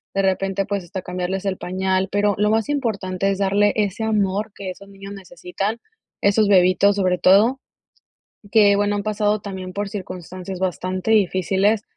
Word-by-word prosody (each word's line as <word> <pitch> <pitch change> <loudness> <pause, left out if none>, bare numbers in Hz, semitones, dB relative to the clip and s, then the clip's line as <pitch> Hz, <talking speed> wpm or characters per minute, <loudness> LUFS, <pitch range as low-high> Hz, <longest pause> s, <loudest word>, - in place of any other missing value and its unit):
De 195 - +2
repente, 195 +1 0
pues, 200 -1 -3
hasta 180 +2 -6
cambiarles 180 +2 -4
el 190 -2 -1
pañal, 190 +1 -1
pero, 205 0 +2
lo 210 +1 +2
más 220 0 +1
importante 195 -9 -1
es 195 - -1
darle 200 +1 +2
ese 205 0 -1
amor, 210 -1 0
que 190 -2 -6
esos 200 +2 -13
niños 195 0 -10
necesitan, 195 +3 -5 0.4
esos 205 +1 +3
bebitos, 190 +1 +4
sobre 185 -2 +1
todo. 210 +9 +4 0.9
Que 205 -3 +6
bueno, 205 0 +1
han 205 - -2
pasado 210 0 0
también 190 -2 -7
por 205 +1 -3
circunstancias, 185 -2 -7
bastante 185 +3 -2
difíciles, 200 +1 +2
195 Hz, 160 wpm, -21 LUFS, 185-205 Hz, 0.9 s, Que